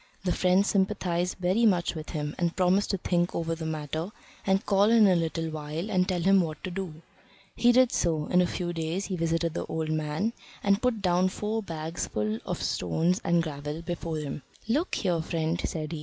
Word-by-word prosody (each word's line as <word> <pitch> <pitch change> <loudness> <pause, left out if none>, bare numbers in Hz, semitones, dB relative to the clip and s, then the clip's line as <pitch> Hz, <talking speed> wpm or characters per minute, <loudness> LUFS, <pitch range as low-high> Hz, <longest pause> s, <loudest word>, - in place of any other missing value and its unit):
The 180 - +1
friend 185 +2 +3
sympathised 190 -3 0
very 185 +6 +2
much 180 -6 +3
with 155 -1 -7
him, 150 -2 -3
and 170 -1 0
promised 185 +2 +2
to 195 - +1
think 175 -1 0
over 165 0 -1
the 160 -1 -4
matter, 155 +3 -3 0.4
and 195 +1 +2
call 200 0 +4
in 225 -2 +6
a 190 -2 +5
little 165 -1 -1
while 155 +5 -4
and 185 0 +2
tell 180 -2 0
him 195 +1 +5
what 155 -3 -4
to 185 - -4
do. 175 -4 -6 0.5
He 240 +2 +5
did 255 0 +5
so; 160 -3 +1
in 180 +3 +3
a 180 - +2
few 175 0 -3
days 165 +4 -2
he 190 - -3
visited 165 -1 0
the - - -4
old 160 -1 -2
man 155 +8 -1 0.3
and 200 +1 +3
put 240 -5 0
down 180 0 +3
four 215 +3 -2
bags 165 -3 -4
full 105 +1 -2
of - - -3
stones 165 - 0
and 170 0 +2
gravel 150 +1 -5
before 165 -1 -3
him. 150 -1 -4 0.3
"Look 295 +11 +1
here, 175 -5 0
friend," 165 0 -1
said 155 -1 -3
he. 165 - -4
175 Hz, 205 wpm, -28 LUFS, 160-190 Hz, 0.5 s, in